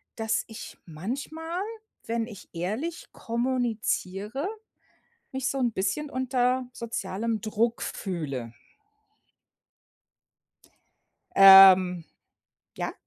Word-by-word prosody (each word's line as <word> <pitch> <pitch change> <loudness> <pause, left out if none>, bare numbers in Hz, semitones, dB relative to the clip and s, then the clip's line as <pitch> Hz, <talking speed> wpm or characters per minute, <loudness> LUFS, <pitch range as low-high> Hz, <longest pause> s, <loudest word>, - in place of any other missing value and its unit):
dass 220 -1 -1
ich 220 - -10
manchmal, 285 - -5 0.4
wenn 230 0 -2
ich 210 -5 -12
ehrlich 220 - -4
kommuniziere, 235 - -2 0.9
mich 265 0 -2
so 275 - -3
‘n 240 -2 +1
bisschen 210 +10 -2
unter 255 0 0
sozialem 225 -1 -3
Druck 225 +3 -1
fühle. 145 - -4 2.9
Ähm, 190 -3 +8 0.7
ja? - - -3
225 Hz, 80 wpm, -27 LUFS, 190-255 Hz, 2.9 s, Ähm